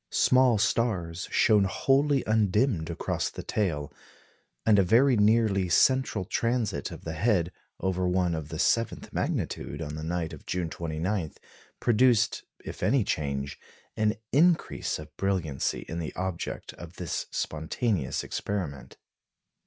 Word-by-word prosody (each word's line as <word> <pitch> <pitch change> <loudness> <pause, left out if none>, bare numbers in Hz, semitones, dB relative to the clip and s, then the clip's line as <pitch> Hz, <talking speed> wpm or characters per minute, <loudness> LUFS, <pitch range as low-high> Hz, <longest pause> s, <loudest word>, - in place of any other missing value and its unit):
Small 130 -3 +4
stars 100 -6 0
shone 105 -3 +4
wholly 135 +7 +2
undimmed 105 -4 +1
across 85 - -2
the - - -8
tail, 80 -9 -2 0.7
and 105 -2 +5
a - - +5
very 120 +8 +4
nearly 105 -3 +3
central 125 +1 +3
transit 115 0 -1
of - - -10
the 80 - -4
head 90 0 +1 0.3
over 95 -1 0
one 90 -1 +1
of 80 -2 -4
the 80 - -5
seventh 115 +8 0
magnitude - - -2
on 75 - -5
the 75 0 -6
night 85 0 -2
of - - -12
June 90 -3 -2
29, 85 +2 -2 0.5
produced 120 -1 +3 0.2
if - - -7
any 135 -4 +3
change 70 -5 -3 0.4
an 110 0 +1 0.2
increase 165 +4 +2
of 75 0 -11
brilliancy 90 -8 -1
in 85 - -4
the 80 - -5
object 95 -2 -4
of 85 +1 -11
this 90 -3 -3
spontaneous 80 - -2
experiment. 85 -10 -4
95 Hz, 135 wpm, -28 LUFS, 80-115 Hz, 0.7 s, and